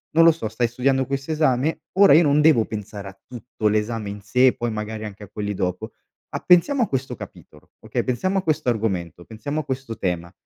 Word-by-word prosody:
Non 165 +1 +7
lo 165 - +8
so, 155 -8 -4
stai 115 +2 0
studiando 130 +2 0
questo 140 +3 -3
esame? 150 -1 +1
Ora 195 -5 +6
io 160 - +7
non 145 0 +3
devo 150 -8 +5
pensare 105 -2 -7
a 95 0 -12
tutto 120 -3 -4
l'esame 105 0 -1
in 100 0 -7
sé 125 +6 +3
e 125 - +4
poi 120 - -2
magari 110 0 -5
anche 105 0 -9
a 95 - -12
quelli 105 -1 -3
dopo. 95 +3 -3 0.4
A - - -1
pensiamo 210 +10 +4
a 220 - -1
questo 130 -2 -3
capitolo, 75 -8 -13
okay, - - -3
pensiamo 185 +10 -1
a 190 - -5
questo 155 -5 0
argomento, 95 -7 -2
pensiamo 145 +8 -4
a - - -14
questo 130 -4 -5
tema 85 -3 -3
120 Hz, 220 wpm, -22 LUFS, 105-140 Hz, 0.4 s, lo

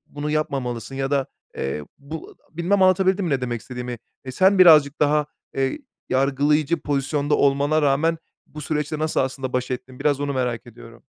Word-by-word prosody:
bunu 145 +1 -3
yapmamalısın 135 -5 -2
ya 135 +1 -2
da 140 -2 +2 0.3
eee, 70 +3 -3
bu 155 +3 -9 0.2
a" - - -21
bilmem 190 +4 +1
anlatabildim 190 +1 +3
mi 165 - -2
ne 135 -2 +1
demek 120 -2 -3
istediğimi? 125 -1 -6 0.3
Eee, 130 - -5
sen 190 +7 +3
birazcık 155 -5 +7
daha, 150 0 +3 0.3
eee, 135 - -1 0.3
yargılayıcı 145 +4 +2
pozisyonda 145 +1 0
olmana 145 +2 +2
rağmen 150 +4 +2 0.3
bu 150 - -9
süreçle 150 0 -2
nasıl 155 0 0
aslında 130 -1 -2
baş 125 0 -1
ettin? 125 0 -6
Biraz 145 -2 +1
onu 145 0 -2
merak 125 -2 -2
ediyorum. 115 0 -14
140 Hz, 170 wpm, -23 LUFS, 130-155 Hz, 0.3 s, birazcık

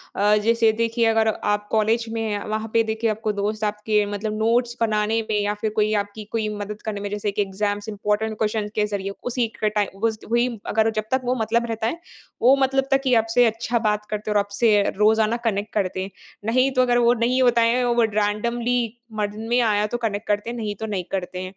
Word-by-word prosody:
अ, 210 +1 +3
जैसे 230 -1 +4
देखिए 230 0 +1
अगर 225 0 +3 0.2
आप 205 0 -1
कॉलेज 220 +1 +2
में 225 - -1
हैं, 210 -2 -2
वहाँ 220 +1 -2
पे 230 - +4
देखिए 220 +1 -1
आपको 215 0 -1
दोस्त 215 +1 -2
आपके 210 0 +1
मतलब 215 +1 -3
नोट्स 235 +2 +1
बनाने 220 0 +1
में 210 - +1
या 205 0 0
फिर 220 - 0
कोई 215 0 +2
आपकी 205 +1 -9
कोई 220 -2 -1
मदद 205 +1 -6
करने 210 -2 -3
में 205 - -4
जैसे 205 0 -2
कि 205 - -1
एग्ज़ाम्स 205 +1 -2
इम्पॉर्टेंट 210 +1 -1
क्वेस्शन्स 215 -1 -1
के 210 - +2
ज़रिए, 195 0 -3 0.2
उसी 240 -1 0
के 215 - +3
टाइम 200 -1 -1
बस 220 -1 -3
वही 240 +1 +3 0.3
अगर 220 +1 +3
जब - - -2
तक 260 - +2
वो 250 +1 +1
मतलब 235 +2 +1
रहता 225 0 -1
है, 330 - -3 0.4
वो 255 +3 +6
मतलब 270 0 +1
तक 270 0 +4
की 260 -2 +2
आपसे 225 +2 +3
अच्छा 230 +1 0
बात 210 0 0
करते 210 0 -4
हैं - - -1
और - - +5
आपसे 205 +2 +1 0.2
रोज़ाना 220 +2 +3
कनेक्ट 205 0 -2
करते 185 -2 -1
हैं। 190 +1 -5 0.3
नहीं 255 +4 +2
तो 255 - +3
अगर 245 -1 +3
वो 240 - +6
नहीं 255 +2 +2
होता 240 -2 +4
है 250 +1 +1
वो 235 0 +3
रैंडमली 235 +4 0 0.3
मन 210 -1 -2 0.2
में 240 +1 +3
आया 210 -2 +2
तो 240 - -3
कनेक्ट 215 -3 -3
करते, 205 +2 0
नहीं 215 -3 -4
तो 220 - -5
नहीं 200 -4 -3
करते 190 -2 -2
हैं। - - -4
220 Hz, 225 wpm, -23 LUFS, 210-230 Hz, 0.4 s, वो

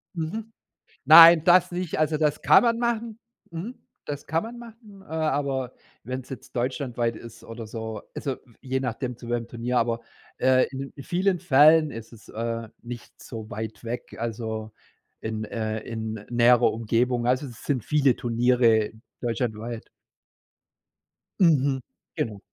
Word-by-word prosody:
Mhm. 210 +8 -4 0.5
Nein, 165 +1 +10
das 180 +1 +5
nicht, 175 -3 -3
also, 155 0 +2
das 150 -1 0
kann - - +6
man 230 0 +2
machen. 235 -2 -2 0.3
Mhm. 185 +10 -6 0.3
Das 145 -1 -6
kann 160 +2 0
man 235 +2 -8
machen, 225 -4 -13
äh, - - -19
aber 140 -5 -1 0.3
wenn 130 +3 -4
es - - -19
jetzt 130 -2 -10
deutschlandweit 120 -2 -1
ist 115 -1 -12
oder 115 -1 -8
so, 110 -1 -6
also, 135 -2 -3 0.2
je 130 0 -2
nachdem 125 -1 -4
zu 120 - -11
welchem 120 -1 -2
Turnier, 120 +1 -2
aber, 115 0 0 0.4
äh, 130 0 +4
in 135 +1 -6
in 140 - -9
vielen 180 +2 0
Fällen 155 0 +5
ist 115 +1 -9
es, 105 -3 -16
äh, 115 0 -4
nicht 120 0 -10
so 110 -2 -8
weit 110 +2 -6
weg, 120 +2 -6
also, 110 -1 -4 0.5
in, 110 0 -4
äh 110 0 -3
in 110 -1 -5 0.2
näherer 120 0 +5
Umgebung, 120 +2 0
also, 130 +3 +1
es 120 - -12
sind 130 -7 -1
viele 140 -4 +3
Turniere 120 -2 +2 0.3
deutschlandweit. 115 -1 -3 1.5
Mhm. 140 -6 +3 0.3
Genau. 105 -3 -3
125 Hz, 150 wpm, -25 LUFS, 115-155 Hz, 1.5 s, Nein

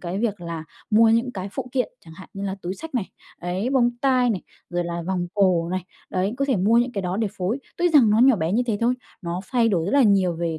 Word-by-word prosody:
cái 180 +2 -4
việc 210 -4 -1
là 170 -2 -5 0.3
mua 225 +1 +6
những 230 +3 +2
cái 190 0 -5
phụ 255 +2 -5
kiện. 255 -2 0 0.2
Chẳng 160 -1 -13
hạn 190 +2 -12
như 195 0 -5
là 190 - -2
túi 180 +2 -3
xách 320 +1 -9
này. 220 -6 -2 0.3
Ấy, 185 +8 -2
bông 245 -3 +3
tai 255 -2 +3
này, 195 - -2 0.3
rồi 175 0 -1
là 170 0 -4
vòng 180 -2 -1
cổ 180 -4 +2
này. 185 0 -3 0.3
Đấy, 190 +4 -1
có 275 - 0
thể 265 -5 +1
mua 215 +6 +4
những 245 +1 +1
cái 200 - -3
đó 180 +1 -2
để 220 0 0
phối. 195 +9 -1 0.2
Tuy 350 - +2
rằng 275 -10 +5
nó 215 - +3
nhỏ 255 -1 +6
bé 165 0 -1
như 240 +4 +2
thế 220 -4 0
thôi, 240 +2 +2 0.3
nó 175 +1 -3
thay 235 -3 +3
đổi 170 -6 +1
rất - - -2
là 280 - +5
nhiều 195 -5 +3
về 165 -2 -2
200 Hz, 270 wpm, -23 LUFS, 180-240 Hz, 0.3 s, mua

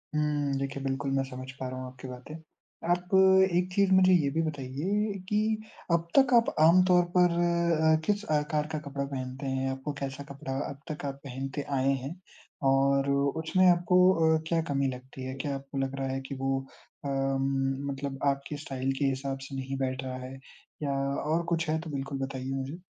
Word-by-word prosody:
हुँ। 145 -2 +1
देखिए 140 0 -3
बिल्कुल 135 0 -1
मैं 135 0 +2
समझ 130 0 -7
पा 130 - -3
रहा 130 - -6
हूँ 130 - -5
आपकी 130 +1 -10
बातें। 125 +5 -9 0.5
आप 180 +2 0 0.4
एक 180 +1 0
चीज़ 200 -1 +3
मुझे 185 0 +6
ये 150 -6 +4
भी 165 +2 +1
बताइए 155 +9 -1 0.2
कि 210 - +2 0.5
अब 170 0 +2
तक 265 -2 +6
आप 235 -1 +5
आम 170 +4 +7
तौर 180 -1 +5
पर 180 -1 +5 0.6
अ, - - +6
किस 205 +1 0
आकार 150 0 +1
का 155 - -2
कपड़ा 140 0 -2
पहनते 130 0 -5
हैं? 135 0 -1
आपको 135 +2 -4
कैसा 135 +1 -4
कपड़ा 140 -1 -5
अब 140 0 -8
तक 150 -1 -5
आप 135 -1 -3
पहनते 135 +2 -4 0.2
आए 135 +1 +3
हैं? 150 +6 -5 0.5
और 135 +1 +3
उसमें 160 +6 +2
आपको 175 +1 +3 0.4
अ, - - -5
क्या 165 -1 +2
कमी 140 -1 +1
लगती 130 +1 -10
है? 130 - -4
क्या 140 +1 -3
आपको 135 0 -7
लग 135 0 -1
रहा 135 - -1
है 135 0 -2
कि 140 - -4
वो 135 0 +1 0.5
अ, - - -1
म 135 0 0
मतलब 135 0 -5
आपके 140 +2 -7
स्टाइल 135 -2 -3
के 140 - +2
हिसाब 135 0 -1
से 135 - -7
नहीं 135 0 -4
बैठ 130 0 -2
रहा 130 -1 -4
है? 130 - -8 0.5
या 140 -1 0 0.4
और 165 +2 +2
कुछ 165 -1 0
है 160 +1 +1
तो 165 - -8
बिल्कुल 135 -1 -4
बताइए 135 -1 -4
मुझे? 135 +6 -4
140 Hz, 195 wpm, -29 LUFS, 135-155 Hz, 0.6 s, आम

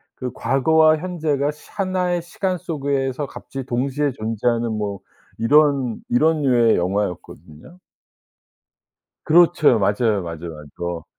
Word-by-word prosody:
그 125 -1 -5
과거와 155 +6 +3
현재가 155 -4 -1
시 150 - -18
하나의 185 -3 -1
시간 185 +2 -3
속에서 140 -5 -2
갑자기 135 -1 -8
동시에 135 +3 -1
존재하는 115 0 -1
뭐 105 -2 -3 0.4
이런, 140 -1 +2
이런 155 +5 +2
류의 120 -4 +4
영화였거든요. 90 - -4 1.4
그렇죠. 160 -6 +4
맞아요. 105 +1 +1
맞아요. 85 0 -7
맞어. 75 -1 -11
또 85 -2 -5
135 Hz, 275 characters per minute, -21 LUFS, 110-155 Hz, 1.4 s, 류의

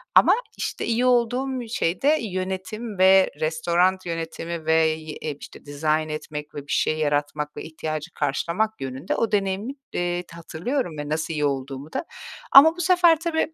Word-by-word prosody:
Ama, - - +7 0.2
işte, - - -3
iyi 235 +2 +1
olduğum 250 +1 +1
şey 175 -6 -1
de 300 +3 +4
yönetim 190 +2 -4
ve 190 0 +6
restoran 170 +4 +1
yönetimi 165 0 -5
ve 160 - +3
y 160 -1 +3 0.2
eee, 150 -2 -4
işte, - - -12
dizayn 155 +2 0
etmek 150 -1 -6
ve 145 - -4
bir - - -6
şey 155 - +1
yaratmak 150 0 -1
ve - - -5
ihtiyacı 155 +1 -5
karşılamak 170 +9 -1
yönünde 130 +5 -3
o 230 - 0
deneyimi, 200 +5 -1 0.2
eee, 175 0 -1
hatırlıyorum 170 - -3
ve 145 0 -5
nasıl 160 +1 -2
iyi 150 -1 0
olduğumu 135 +1 -4
da. - - -2 0.5
Ama 320 +4 +9
bu - - -2
sefer, 350 -2 +5
tabii 320 -1 -1
170 Hz, 165 wpm, -24 LUFS, 155-225 Hz, 0.5 s, Ama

